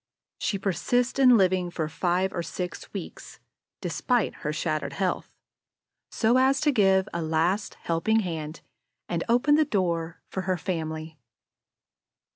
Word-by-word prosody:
She 200 - 0
persists 245 +7 0
in 250 -3 +7
living 185 -2 +2
for 160 -2 -3
five 180 +4 0
or 175 - -2
six 180 +1 -6
weeks, - - -8 0.4
despite 245 -5 0
her 150 - -3
shattered 155 0 -2
health, 190 -2 -1 0.8
so 230 +3 +2
as 265 +1 +3
to 300 - +3
give 195 -6 +3
a 170 - -2
last 165 +6 0
helping 195 +7 +1
hand 160 -4 -5 0.5
and 170 -1 -1
open 245 +5 +4
the 310 +1 +5
door 170 - -1
for 190 - -4
her 185 - +2
family. 160 -3 -4
185 Hz, 135 wpm, -26 LUFS, 165-220 Hz, 0.8 s, in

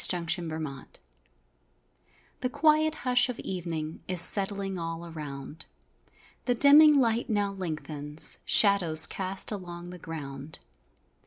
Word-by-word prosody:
DYING 175 -2 -2
OF 170 0 -4
A 160 - -6 0.2
DAY - - -18 1.4
The 250 - -3
quiet 310 +3 +1
hush 250 0 +3
of 250 - -6
evening 165 -4 -7
Is 185 -1 -1
settling 195 0 +4
all 165 0 -7
around, 150 -2 -10 0.8
The 245 - -1
dimming 290 +3 +5
light 235 -1 -1
now 205 -2 -2
lengthens 155 -5 0
Shadows 180 -7 +5
cast 190 +2 -3
along 175 -3 -9
the 180 - -12
ground. 145 -3 -10
180 Hz, 120 wpm, -26 LUFS, 160-215 Hz, 1.4 s, dimming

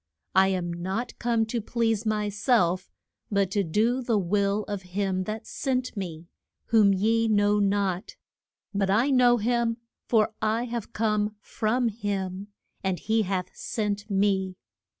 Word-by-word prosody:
I 190 0 +5
am 180 -2 -1
not 190 +8 -3
come 230 -1 +1
to 230 +1 -2
please 225 0 0
my 210 -1 0
self, 200 -4 +1 0.4
but 200 -2 +1
to 200 0 +1
do 220 +9 +1
the 235 -3 +1
will 200 +2 +1
of 205 -2 -4 0.2
him 190 -2 0
that 215 +2 -5
sent 255 -3 -2
me, 170 -5 -5 0.4
whom 215 -3 +5
ye 225 +4 +2
know 205 -1 +3
not. 200 -2 0 0.6
But 200 -1 0
I 235 +8 +3
know 245 -2 +5
him, 235 0 +1 0.3
for 220 -2 +3
I 220 +2 +1
have 235 -3 -5
come 210 -1 0
from 230 +3 0
him, 200 -3 -3 0.4
and 190 -2 0
he 220 +4 +1
hath 185 -2 -2
sent 210 -1 -3
me. 195 -2 +1
210 Hz, 150 wpm, -26 LUFS, 195-225 Hz, 0.6 s, I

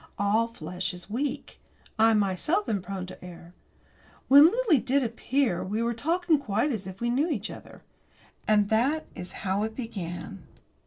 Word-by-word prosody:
All 210 +3 +2
flesh 180 -4 -5
is 180 +3 -12
weak. 275 +5 -3 0.4
I 225 0 +5
myself 210 - +1
am 200 -3 -1
prone 190 0 -5
to 185 - -12
err. 175 -1 -11 0.8
When 285 +3 +9
Lily 450 - +3
did 270 +3 +1
appear, 235 -3 0
we 210 +4 -2
were 235 0 0
talking 325 +5 +1
quite 235 +2 0
as 205 -6 -4
if 190 0 -9
we 240 0 0
knew 285 +7 +1
each 220 - -3
other. - - -12 0.6
And 210 -1 +3
that 265 +8 +1
is 180 - -7
how 190 +2 0
it 220 +1 -3
began. 195 -5 -6
220 Hz, 165 wpm, -27 LUFS, 190-275 Hz, 0.8 s, When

